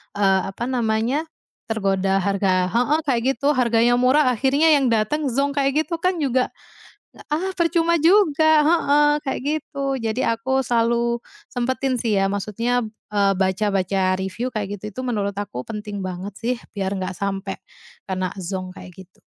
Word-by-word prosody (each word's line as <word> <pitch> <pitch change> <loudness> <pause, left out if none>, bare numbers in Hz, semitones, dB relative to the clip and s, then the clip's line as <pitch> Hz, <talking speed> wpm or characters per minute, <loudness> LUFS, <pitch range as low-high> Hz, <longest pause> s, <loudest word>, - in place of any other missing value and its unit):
eee, 195 -2 +3
apa 235 - -6
namanya, 235 +4 0 0.4
tergoda 195 -3 0
harga 185 -2 +1
heeh, 250 +7 +2
kayak 250 -6 0
gitu. 285 +1 +1
Harganya 240 -1 +3
murah, 255 +1 +4
akhirnya 280 +6 +3
yang 280 -3 +4
datang 235 +7 +1
zonk, 280 +3 0
kayak 275 +3 +2
gitu 335 0 -4
kan 365 +1 +1
juga, 260 -5 +1 0.7
nggak - - -17
ah, 330 +6 -1
percuma 340 -1 +1
juga 320 -3 +4 0.2
heeh, 295 -2 +4
kayak 270 -2 -3
gitu. 295 -1 -3 0.2
Jadi 225 +3 -1
aku 260 +4 0
selalu 235 0 +1 0.3
sempetin 255 0 -1
sih 220 -3 0
ya, 195 0 +1
maksudnya, 230 +5 -1 0.3
eee, 200 -1 +3
baca-baca 190 -1 +1
review 190 +7 -3
kayak 205 -4 -4
gitu, - - -14
itu - - -3
menurut 205 -5 -2
aku 200 -12 -4
penting 210 -2 -5
banget 185 +1 -5
sih, 245 +2 -1 0.2
biar 195 -2 -2
nggak 185 0 -3
sampai 195 +1 -4 0.5
kena 185 -1 -2
zonk, 185 0 -5
kayak 180 - -12
gitu. 185 - -32
235 Hz, 155 wpm, -22 LUFS, 195-275 Hz, 0.7 s, murah